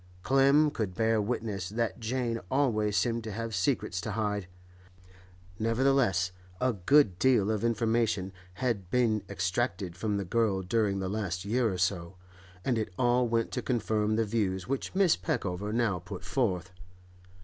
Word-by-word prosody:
Clem 140 +3 +4
could 105 -8 -3
bear 110 +1 +2
witness 105 -4 -3
that 115 +2 -2
Jane 115 0 -1
always 110 -7 +1
seemed 115 +3 0
to 110 - -4
have 115 +2 -4
secrets 95 -1 0
to 105 - -4
hide; 105 -3 -2 1.1
nevertheless 115 -5 +2 0.3
a 130 -1 +2
good 105 -1 +3
deal 120 -6 +3
of 110 -1 -2
information 115 -4 +1 0.2
had 105 -6 -2
been 115 -3 +2
extracted 95 -1 -2
from 105 +2 -1
the 100 - -3
girl 100 -1 +1
during 100 +1 +1
the 95 -1 -2
last 95 -2 -3
year 115 +1 +1
or 95 - -3
so, 90 -1 -1 0.5
and 120 -4 +1
it 110 -2 -3
all 120 0 +3
went 115 0 0
to - - -2
confirm 110 -3 0
the 115 0 +1
views 100 -4 -1
which 135 +7 -3
Mrs. 190 -4 +3
Peckover 105 - -2
now 110 -5 +1
put 85 0 -8
forth. 95 -10 -1
110 Hz, 155 wpm, -29 LUFS, 95-120 Hz, 1.1 s, Clem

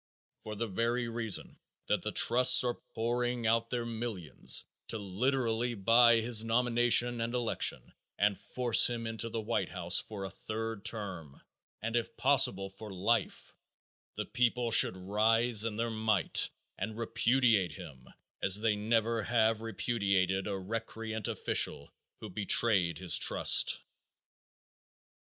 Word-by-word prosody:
For 110 -1 -9
the 115 +3 -3
very 115 +4 -2
reason 115 -3 -3 0.3
that - - -1
the - - -4
trusts 125 +1 +5
are 120 -1 -1 0.2
pouring 120 +1 -2
out 115 +1 0
their 120 -1 -4
millions 110 -8 0 0.2
to - - -5
literally 120 +3 -2
buy 115 +3 +4
his 115 -1 +3
nomination 120 0 +2
and 115 +2 -3
election 120 -2 -2 0.2
and 100 0 +1
force 125 +2 +2
him 120 -1 -5
into 115 +1 -3
the 115 - -5
White 110 +2 -3
House - - +1
for 105 -3 -7
a 95 - -6
third 110 0 -7
term, 95 -10 -6 0.4
and 115 +1 -4
if 120 -1 -3
possible 120 -8 +1
for 105 +2 -11
life, 100 +5 -2 0.6
the - - -5
people 125 -1 -1
should 95 - +5
rise 110 +4 +2
in 110 -2 -4
their 115 +1 -3
might 110 -4 0 0.3
and 110 +3 -5
repudiate 115 -5 +1
him 65 -3 -13 0.3
as 95 +2 +5
they 110 -2 +1
never 115 +2 -1
have 110 0 0
repudiated 100 -5 -1
a 100 -2 -4
recreant 110 +2 -5
official - - 0 0.3
who 110 - -8
betrayed 95 -3 +2
his 90 -1 -1
trust. - - +4
115 Hz, 135 wpm, -30 LUFS, 105-120 Hz, 0.6 s, trusts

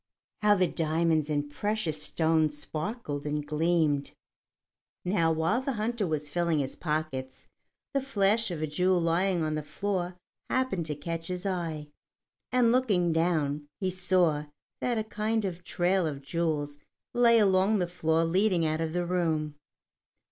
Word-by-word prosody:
How 210 -1 +5
the 185 -2 +3
diamonds 160 -2 +1
and 145 -1 0
precious 165 0 -2
stones 160 -1 +1
sparkled 155 - -4
and 150 0 -2
gleamed! 150 -2 +1 0.9
Now, 175 -3 +2
while 165 +10 +1
the 270 +1 -2
hunter 220 -2 -1
was 150 -2 -2
filling 170 +1 0
his 135 -2 -2
pockets, 150 -5 -3 0.5
the 275 - +1
flash 220 -3 +2
of 165 -3 -4
a - - +2
jewel 180 +4 +2
lying 170 +1 +1
on 155 0 -1
the 155 - -1
floor 180 +3 -3 0.3
happened 255 -11 0
to 150 - -2
catch 165 +2 -4
his 180 +1 -4
eye, 165 -6 -3 0.6
and 245 -2 +4
looking 200 -10 +2
down, 155 -3 0
he 190 -2 0
saw 180 -4 +2 0.3
that 240 -2 0
a 220 - 0
kind 220 0 -1
of 180 -1 -4
trail 180 0 +1
of 140 -2 -5
jewels 145 -2 -2 0.3
lay 235 -1 +5
along 195 0 +4
the 180 -2 0
floor 165 -2 +1
leading 180 0 +2
out 155 +1 0
of 160 -1 -2
the 175 0 0
room. 160 -4 0
170 Hz, 155 wpm, -29 LUFS, 155-195 Hz, 0.9 s, How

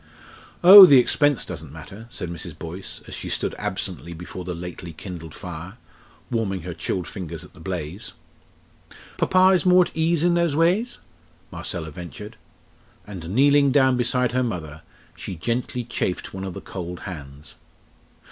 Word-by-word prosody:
"Oh! 190 +2 +12
the 140 -4 +7
expense 145 +2 +3
doesn't - - -8
matter!" 110 +4 -11
said 90 -6 -6
Mrs. 85 -3 -8
Boyce, 90 +4 -8
as - - -9
she - - -6
stood - - -1
absently 95 -4 -4
before 90 +2 -8
the 90 -1 -5
lately 85 0 -8
kindled 80 -2 -9
fire, 90 +3 -8 0.5
warming 100 -7 -1
her 90 0 -5
chilled 90 +2 -3
fingers 85 -4 -7
at - - -16
the 95 - -17
blaze. 90 +2 -6 1.1
"Papa 185 0 +4
is 185 -2 +3
more 180 0 +5
at - - -12
ease 165 0 +1
in 175 0 +3
those 170 -4 +1
ways?" 180 +10 +1 0.5
Marcella 80 -2 -4
ventured. 90 +6 -9 0.7
And 90 -5 -8
kneeling 140 +5 +4
down 130 -2 +4
beside 125 0 +1
her 130 +1 +1
mother 80 -10 -4 0.3
she 95 - -7
gently 120 +6 -2
chafed 115 -6 -3
one 95 0 -5
of 95 - -6
the - - -7
cold 90 -2 -7
hands. 70 -5 -9
95 Hz, 155 wpm, -23 LUFS, 85-130 Hz, 1.1 s, Oh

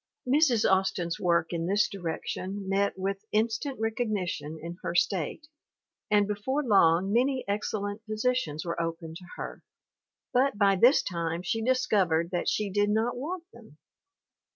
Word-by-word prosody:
Mrs. 260 -4 +4
Austin's 190 -3 +1
work 170 -2 +1
in 170 0 -2
this 205 +2 +3
direction 190 +2 -5
met 195 +1 +1
with 195 +1 -3
in 220 +2 +3
stant 265 +3 -4
recognition 210 -9 -2
in 170 +2 -8
her 170 - -3
state, 185 - 0 0.6
and 205 -1 +4
before 235 +8 -1
long 195 - +4
many 255 +2 +2
excellent 205 +1 -2
positions 215 -8 -1
were 170 0 -2
open 165 -1 -4
to 180 +2 -10
her, - - -7 0.7
but 255 -3 +2
by 200 -1 +4
this 245 +9 +5
time 170 -1 -3
she 225 +5 -1
discovered 210 -10 +2
that 175 - 0
she 210 -2 -1
did 205 +1 +2
not 220 +3 +1
want 330 +8 -4
them. - - -16
200 Hz, 150 wpm, -28 LUFS, 175-225 Hz, 0.7 s, this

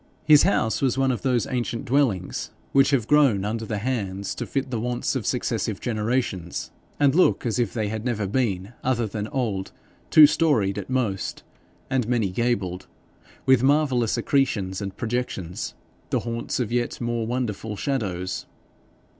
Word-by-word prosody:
His 150 -2 +8
house 150 - +1
was 135 -2 +1
one 135 -1 +3
of 125 - -3
those 125 -4 +1
ancient 120 -2 -3
dwellings 120 -9 0 0.2
which 135 0 +5
have 135 -6 +2
grown 135 -10 +4
under 110 +1 -3
the 110 - -2
hands 100 -4 -2
to - - -5
fit 135 -1 -2
the 120 - -1
wants 120 +2 -1
of - - -2
successive - - -1
generations, 110 -6 -2 0.3
and 140 -2 +4
look 180 -4 +3
as 120 +1 0
if 115 -5 +1
they 110 -3 -2
had 110 0 -4
never 115 -4 -1
been 100 -2 -1
other 120 -3 +1
than 105 0 -4
old; 110 -9 -2 0.4
two 155 - +9
storied 115 - +2
at 95 - -8
most, 120 -7 -1 0.4
and 130 -4 0
many 115 -6 +1
gabled, 95 -4 -1 0.6
with 130 -2 +5
marvellous 135 -4 +2
accretions 105 -9 0
and 100 -1 -5
projections, 110 -7 -3 0.3
the - - 0
haunts 115 +1 -3
of 120 -4 -1
yet 120 0 -1
more 120 -2 -2
wonderful 115 -3 -3
shadows. 95 -8 -2
120 Hz, 160 wpm, -24 LUFS, 105-130 Hz, 0.6 s, two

